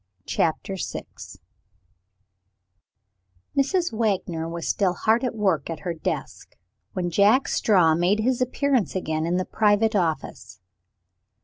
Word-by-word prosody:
CHAPTER 175 +4 -1
VI - - -4 2.5
Mrs. 340 +3 +1
Wagner 185 -7 -1
was 170 -1 -5
still 185 -3 +1
hard 225 +6 +2
at 250 - -2
work 190 -10 0
at 160 -2 -5
her 175 +2 -3
desk, 165 - -5 0.4
when 175 -2 -2
Jack 210 +9 +4
Straw 180 -7 +3
made 175 +5 +2
his 250 +2 0
appearance 255 -3 0
again 160 -3 -2
in 175 +1 +1
the 185 - -1
private 215 +1 +2
office. 155 - -2
190 Hz, 120 wpm, -24 LUFS, 165-225 Hz, 2.5 s, Jack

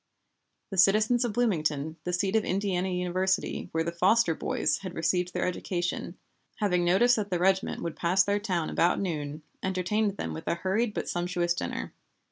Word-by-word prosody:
The 195 - -1
citizens 215 +6 +4
of 235 -3 -1
Bloomington, 160 -10 0
the 180 - -1
seat 190 +3 0
of 220 - +3
Indiana 190 -1 -1
University 180 +1 -1
where 160 0 0
the 170 - -2
"Foster 180 +2 +3
boys" - - 0
had 185 -2 -7
received 180 +2 0
their - - -1
education, 175 0 -3 0.4
having 180 -4 +1
notice 195 +8 +4
that 205 -2 -2
the 180 - 0
regiment 190 +2 +1
would 165 -2 -3
pass 180 +3 +3
their 200 +1 0
town 180 -6 -2
about 175 - +2
noon, 155 -5 -3 0.2
entertained 190 +2 0
them - - -4
with 160 - -8
a - - +1
hurried 210 +5 -1
but - - -3
sumptuous 175 0 0
dinner. 175 - -4
180 Hz, 175 wpm, -28 LUFS, 175-200 Hz, 0.4 s, citizens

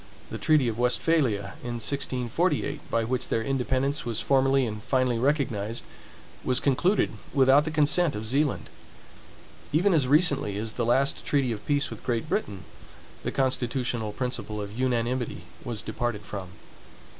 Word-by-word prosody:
The - - -5
treaty 150 -5 +3
of 115 0 -2
Westphalia, 120 -5 +1
in 120 0 -4
1648, 140 +5 -1
by 115 - +1
which 125 +2 -1
their 115 - 0
independence 135 +2 0
was 115 -2 -2
formerly 135 -1 +3
and 105 -2 -5
finally 130 -1 +1
recognized, 120 -5 0 0.6
was 125 0 +2
concluded 175 +9 +2 0.2
without 135 +2 +5
the - - -1
consent 155 +1 +3
of 105 +1 -4
Zealand. 140 +5 0 1.0
Even 180 +6 +3
as 145 -6 +3
recently 140 - +3
as 110 +1 -3
the 120 - -1
last 135 +3 +2
treaty 140 -4 +1
of 105 -2 -6
peace 145 -1 +1
with - - -8
Great 120 +2 -1
Britain, 155 - -2 0.6
the - - -3
constitutional 125 -4 -1
principle 115 -2 -4
of 100 -1 -5
unanimity 120 0 -1 0.2
was 115 -5 -5
departed 120 -4 -3
from. 95 -3 -6
130 Hz, 145 wpm, -27 LUFS, 115-140 Hz, 1.0 s, without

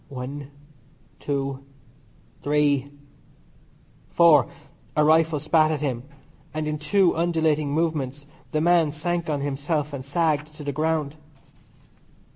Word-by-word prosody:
One, 140 +1 -6 0.7
two, 140 -1 -3 0.8
three, 145 -1 +1 1.2
four 160 -6 +5 0.3
" - - -23
A 150 - +5
rifle 160 0 +3
spat 155 +1 +3
at 155 -2 -2
him, 130 -5 -2 0.5
and 155 0 -2
in 150 0 -2
two 180 +4 +2
undulating 160 -3 +1
movements 145 -3 -1 0.3
the 155 - 0
man 170 -2 +4
sank 170 +3 -3
on 145 -2 -1
himself 145 +2 -2
and 135 -2 -5
sagged 150 +1 -1
to 150 - -9
the 145 - -2
ground. 155 0 -1
150 Hz, 120 wpm, -24 LUFS, 140-160 Hz, 1.2 s, four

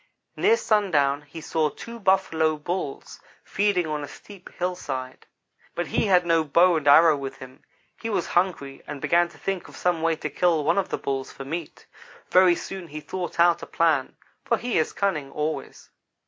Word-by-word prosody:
"Near 450 +3 +3
sundown 155 - +1
he 150 +2 -11
saw 155 -1 0
two 235 +9 -10
Buffalo 165 -6 +2
Bulls 160 -2 -5 0.2
feeding 200 -3 +1
on 150 -1 -3
a - - -6
steep 200 +3 -13
hillside; 140 -8 -4 0.5
but 175 - -1
he 210 - 0
had 180 -2 +4
no 165 -1 +3
bow 170 +4 +4
and 150 -2 -4
arrow 160 +2 +7
with 135 -1 -6
him. 130 -1 -12 0.4
He 225 - -3
was 210 - 0
hungry, 165 -7 0
and 145 - -6
began 170 +4 +2
to - - -17
think 195 -2 -3
of - - -13
some 175 -2 0
way 165 0 +2
to - - -5
kill 170 -4 +2
one 165 +6 +2
of 195 - -2
the - - -2
Bulls 135 -1 -3
for 135 - -9
meat. 160 +2 -6 0.5
Very 180 -1 +6
soon 190 0 -7
he 155 -1 -7
thought 180 +2 -6
out 170 0 +4
a - - -8
plan, 160 -5 +1 0.3
for 235 - +1
he 240 -6 -1
is 160 - 0
cunning 155 -9 -2
always. 150 +2 -5
165 Hz, 190 wpm, -25 LUFS, 150-185 Hz, 0.5 s, arrow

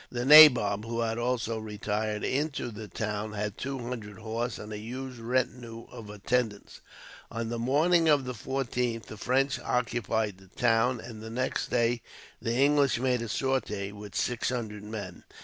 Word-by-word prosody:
The 120 0 -3
nabob, 125 -9 +8
who 115 +1 -3
had 115 0 -1
also 120 -2 -1
retired 105 0 -3
into 140 -3 -1
the 105 0 -8
town, 105 +1 -3
had 105 0 -3
two 135 +1 -4
hundred 120 -5 -6
horse 115 +2 -3
and 105 +1 -8
a 105 - -5
huge 125 +3 -7
retinue 120 -1 -2
of 115 -4 -10
attendants. 105 +1 -2 0.5
On 115 0 -4
the 120 0 -3
morning 160 +7 +3
of 145 -3 +4
the 125 - -3
14th 125 -3 -2
the 110 - -9
French 135 +5 +1
occupied 110 -4 -1
the 95 - -17
town, 120 +4 +2
and 110 -1 -9
the 110 - -7
next 130 +3 -2
day 120 -1 +1 0.4
the 115 - -1
English 140 -1 +4
made 125 -1 +1
a 115 - -4
sortie, 105 -6 -1
with 105 -1 -10
six 120 -2 0
hundred 110 -5 -4
men. 105 -5 -7
115 Hz, 165 wpm, -29 LUFS, 105-125 Hz, 0.5 s, nabob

